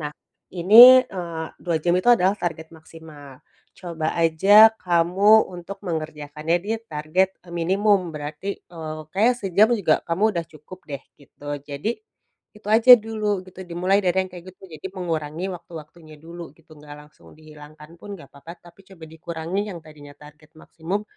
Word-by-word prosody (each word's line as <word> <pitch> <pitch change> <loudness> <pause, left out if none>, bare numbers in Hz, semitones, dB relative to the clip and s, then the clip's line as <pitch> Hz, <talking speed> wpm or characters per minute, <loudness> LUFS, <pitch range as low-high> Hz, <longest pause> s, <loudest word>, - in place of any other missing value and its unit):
Nah 150 -1 -5 0.4
ini, 235 +9 +8
eee, 170 -3 -6 0.2
2 170 -2 -1
jam 175 +1 +1
itu 185 +6 -1
adalah 195 -3 +2
target 160 -2 -6
maksimal. 155 -4 -15 0.4
Coba 165 -4 -4
aja 195 +7 +6
kamu 185 +5 +3
untuk 180 +3 -9
mengerjakannya 155 0 -3
di 210 - -4 0.2
target 155 +6 -1
e - - -17
minimum 190 +1 0
berarti, 150 +6 -6
eee, 160 -2 -9
kayaknya 225 +6 +3
sejam 200 +3 +3
juga 175 -7 +2
kamu 170 +4 -3
udah 170 - -2
cukup 155 +4 -14
deh 140 -2 -6 0.2
gitu. 145 +1 -14
Jadi 145 +10 -4 0.6
itu 210 -1 -12
aja 230 +3 +7
dulu 215 -3 -3
gitu 185 0 -13
dimulai 180 +3 0
dari 180 -1 +1
yang 185 - -12
kayak 175 -1 -11
gitu. - - -34
Jadi 155 - -8
mengurangi 165 -1 -4
waktu-waktunya 160 -2 -13
dulu 165 -1 -11
gitu, 165 -1 -22
nggak 145 0 -12
langsung 150 - -21
dihilangkan 155 +1 -15
pun 205 +1 -9
nggak 140 - -16
papa, 160 +4 -12
tapi 175 +3 -19
coba 180 -5 -14
dikurangi 165 +3 -5
yang - - -8
tadinya 145 -2 -15
target 150 +1 -18
maksimum 175 +6 -5
170 Hz, 160 wpm, -22 LUFS, 155-190 Hz, 0.6 s, ini